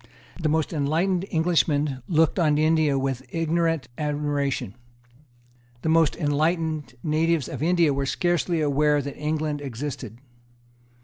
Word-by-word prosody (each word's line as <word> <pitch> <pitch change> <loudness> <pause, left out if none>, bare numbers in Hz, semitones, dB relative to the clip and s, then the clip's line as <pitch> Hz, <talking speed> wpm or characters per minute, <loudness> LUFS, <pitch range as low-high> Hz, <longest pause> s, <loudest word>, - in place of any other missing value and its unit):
The 155 - +1
most 160 +2 0
enlightened 170 +6 0
Englishmen 155 -5 +1
looked 160 +2 +2
on 150 -3 +3
India 155 -2 +3
with 135 -1 -1
ignorant 165 -3 0
admiration. 145 -6 -1 1.1
The 160 - 0
most 165 -2 +3
enlightened 155 -3 -1
natives 160 -1 +1
of 130 - -6
India 170 -2 +3
were 135 0 -2
scarcely 175 +1 0
aware 150 0 +2
that 140 0 -6
England 150 -1 -2
existed. 130 -4 -6
155 Hz, 120 wpm, -25 LUFS, 145-165 Hz, 1.1 s, on